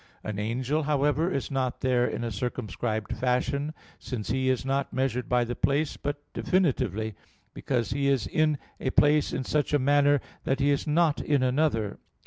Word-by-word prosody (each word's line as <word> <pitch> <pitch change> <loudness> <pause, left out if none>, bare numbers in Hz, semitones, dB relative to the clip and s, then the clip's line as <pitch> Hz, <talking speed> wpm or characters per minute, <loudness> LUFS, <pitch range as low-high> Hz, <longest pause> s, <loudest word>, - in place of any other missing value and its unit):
An 105 -2 -4
angel, 125 +8 -1
however, 150 +3 +1
is 140 -1 -2
not 130 -2 -1
there 125 -2 +2
in - - -3
a 115 - -2
circumscribed 110 0 -3
fashion, 130 +4 0 0.3
since 110 -5 -4
he 130 +1 +1
is 130 -2 0
not 135 +1 0
measured 130 -2 -1
by 125 -1 +3
the 120 +1 -4
place, 145 +2 +1
but 145 0 -4
definitively, 110 - 0 0.4
because 120 -4 -1
he 140 +2 0
is 135 -7 +2
in 155 - +1 0.2
a - - -1
place 145 +2 +3
in 130 - -2
such 150 +2 0
a - - +6
manner 145 +1 +4 0.2
that 135 0 0
he 140 +1 +3
is 140 - 0
not 155 0 +2
in 145 -3 +1
another. 125 -6 +1
135 Hz, 175 wpm, -27 LUFS, 120-145 Hz, 0.4 s, a